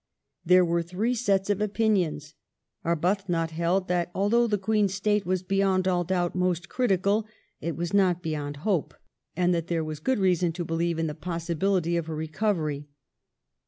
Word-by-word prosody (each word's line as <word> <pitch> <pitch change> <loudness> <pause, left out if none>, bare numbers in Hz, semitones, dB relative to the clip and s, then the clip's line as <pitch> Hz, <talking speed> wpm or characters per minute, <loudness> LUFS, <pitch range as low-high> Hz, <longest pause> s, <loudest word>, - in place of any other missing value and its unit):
There 180 +1 +5
were 170 0 +1
three 185 +8 -1
sets 200 -4 +1
of 205 0 -1
opinions: 195 -8 0 0.5
Arbuthnot 170 0 0
held 170 +3 0
that 175 -1 0
although 230 +5 +3
the 210 -2 +1
Queen's 200 -1 +1
state 205 -1 0
was 185 0 0
beyond 195 -1 +1
all 180 -1 +2
doubt 175 0 0
most 180 -1 0
critical, 210 -2 +1 0.3
it 165 -1 -3
was 175 +2 -3
not 180 -3 +3
beyond 145 -2 -3
hope, 190 -8 0 0.4
and 180 0 +2
that 170 -1 -1
there 165 -2 0
was 155 -1 -5
good 260 +12 0
reason 180 -3 +2
to 175 0 -4
believe 165 +1 -1
in 165 - 0
the 150 - -2
possibility 170 +2 -1
of 165 -1 -3
her 160 - -4
recovery. 155 -2 -2
180 Hz, 165 wpm, -27 LUFS, 165-195 Hz, 0.5 s, There